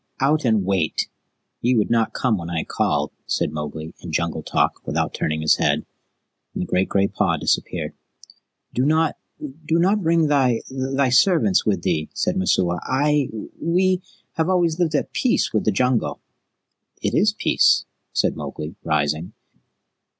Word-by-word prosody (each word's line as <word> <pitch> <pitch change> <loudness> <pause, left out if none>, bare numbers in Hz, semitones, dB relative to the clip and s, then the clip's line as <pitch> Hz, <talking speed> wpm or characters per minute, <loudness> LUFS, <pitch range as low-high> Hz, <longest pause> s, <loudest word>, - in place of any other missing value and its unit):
"Out 145 +2 +2
and 110 -5 +2
wait! 95 -5 0 0.5
Ye 125 +2 +2
would 110 -1 +1
not 115 -1 +2
come 110 -6 0
when 85 0 -6
I 85 -2 -1
called," - - -1 0.2
said - - 0
Mowgli 75 +1 -6
in 85 - -8
Jungle 85 +1 -1
talk, - - 0
without - - -1
turning 80 0 -2
his 75 - +4
head, - - +1 0.7
and - - -1
the - - -3
great 95 +1 0
gray 100 0 +2
paw - - 0
disappeared. - - -1 0.8
"Do 125 - +1
not 155 +2 +2 0.2
do 155 +3 -3
not 195 +5 +2
bring 165 -1 +3
thy 135 -6 +2
thy 135 0 0
servants 130 - +3
with 95 -5 +1
thee," 75 0 -1
said 180 - 0
Messua. 90 - +1
"I 145 +1 +1 0.3
we 185 +2 +2 0.4
have 160 +2 +1
always 175 -3 +1
lived 160 -3 +1
at 145 - -1
peace 255 - +1
with 110 - 0
the 110 - +3
Jungle." 110 - 0 0.8
"It - - -2
is - - +4
peace," - - +3 0.3
said - - +1
Mowgli, 75 +4 -6
rising. 75 +4 -1
125 Hz, 160 wpm, -22 LUFS, -, 0.8 s, his